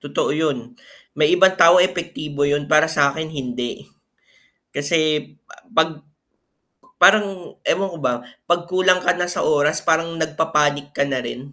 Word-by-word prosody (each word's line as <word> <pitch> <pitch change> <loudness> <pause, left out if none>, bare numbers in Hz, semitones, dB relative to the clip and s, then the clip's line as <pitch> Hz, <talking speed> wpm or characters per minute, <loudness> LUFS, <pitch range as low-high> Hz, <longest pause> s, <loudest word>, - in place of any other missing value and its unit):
totoo 145 - -2
yun 140 -6 -3 0.4
may 150 +3 +2
ibang 190 +1 +5
tao 170 +2 +6
epektibo 170 -5 -3
yun 145 0 -1
para 155 +1 +4
sakin 155 0 +1
hindi, 125 -5 -6 0.9
kasi, 150 +1 +2 0.5
'pag 160 -2 0 0.9
parang 195 -4 +2
ewan 195 0 0
ko 170 - -10
ba 125 -3 0 0.3
'pag 175 0 0
kulang 185 0 +2
ka 180 - +3
na 175 0 -1
sa - - +3
oras 150 0 +2
parang 165 +1 0
nagpapanik 150 -2 -1
ka 140 - 0
na 135 -2 -3
rin. 135 +3 -9
155 Hz, 140 wpm, -19 LUFS, 145-170 Hz, 0.9 s, tao